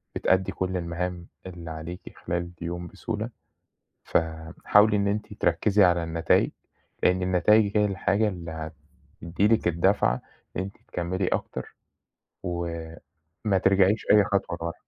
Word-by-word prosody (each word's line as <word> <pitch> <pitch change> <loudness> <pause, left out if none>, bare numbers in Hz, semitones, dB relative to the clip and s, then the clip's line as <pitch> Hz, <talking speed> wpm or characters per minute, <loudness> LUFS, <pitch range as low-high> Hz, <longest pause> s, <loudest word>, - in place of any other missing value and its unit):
بتأدّي 95 0 +2
كل 95 0 -2
المهام 85 +1 -4 0.2
اللي 85 -2 -8
عليكِ 80 +3 -8
خلال 85 0 -2
اليوم 85 +1 -4
بسهولة. 110 +3 -4 0.7
فحاولي 85 +6 +2
إن 100 0 +1
أنتِ 105 +1 -2
تركِّزي 105 -1 +2
على 85 -2 +4
النتايج، 80 0 +2 0.5
لإن 90 +1 +3
النتايج 100 +3 +3
هي 105 - +4
الحاجة 100 +2 +1
اللي 85 -5 -5 0.7
هتدّي 90 +5 +1
لِك 110 -4 +2
الدفعة 85 -7 +2 0.4
إن - - 0
أنتِ 100 +1 -6
تكمِّلي 90 +2 -2
أكتر 65 - -3 0.7
وما 85 +2 -4
ترجعيش 95 +2 +3
أي 105 -2 +6
خطوة 95 -4 -1
لورا. 85 0 -3
90 Hz, 125 wpm, -26 LUFS, 85-100 Hz, 0.7 s, أي